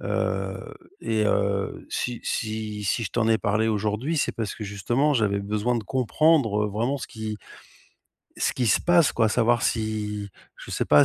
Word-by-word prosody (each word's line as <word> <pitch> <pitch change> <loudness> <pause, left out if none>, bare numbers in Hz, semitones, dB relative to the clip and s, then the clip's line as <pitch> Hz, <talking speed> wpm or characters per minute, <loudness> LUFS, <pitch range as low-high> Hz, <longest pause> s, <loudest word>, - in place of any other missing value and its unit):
heu, - - -2 0.3
et 110 -1 0
heu, 100 -1 0
si 120 -1 -2
si 110 -2 -3
si 105 +4 0
je - - -4
t'en 115 -1 +1
ai 110 - +5
parlé 110 +1 +1
aujourd'hui, 110 +9 -1
c'est - - +1
parce 110 -3 -4
que 110 - -6
justement 120 +9 0
j'avais 105 -5 +2
besoin 105 +4 -1
de 110 - -4
comprendre 130 -3 +2
vraiment 115 +7 -1
ce 130 - -6
qui 110 -1 -5 1.0
ce - - +1
qui 125 - 0
se - - +4
passe 175 -3 +4
quoi, 115 -2 +2
savoir 120 +1 +2
si 105 -2 -1 0.3
je - - -11
sais - - -1
pas 75 -1 +7
110 Hz, 175 wpm, -25 LUFS, 105-120 Hz, 1.0 s, pas